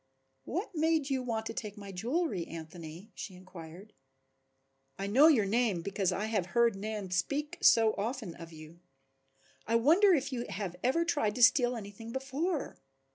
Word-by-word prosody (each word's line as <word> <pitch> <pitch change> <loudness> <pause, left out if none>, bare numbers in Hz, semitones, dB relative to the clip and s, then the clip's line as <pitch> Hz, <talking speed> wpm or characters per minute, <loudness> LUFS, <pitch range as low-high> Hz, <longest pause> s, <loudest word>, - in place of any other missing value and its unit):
"What 380 +5 -4
made 315 -3 +1
you 265 -1 +1
want 225 -3 -3
to 225 - -4
take 210 -2 -6
my 200 -1 -8
jewelry, 230 - -2
Anthony?" 165 +4 -9
she 190 - -8
inquired. 185 +2 -12 1.0
"I 195 - -3
know 255 +10 +6
your 255 -11 +4
name 210 -4 +1
because 195 -1 0
I 200 +3 -2
have 210 -5 -1
heard 235 -3 +4
Nan 205 -1 -5
speak 280 - -1
so 225 -2 +5
often 225 -3 -3
of 165 0 -11
you. 155 +1 -12 0.9
I 230 - +1
wonder 330 - +5
if 275 -2 -2
you 240 -1 -3
have 195 -3 -4
ever 330 +7 +2
tried 225 -11 0
to 250 - +2
steal 245 0 +5
anything 225 +1 -8
before?" 275 +5 -3
220 Hz, 165 wpm, -31 LUFS, 190-265 Hz, 1.0 s, know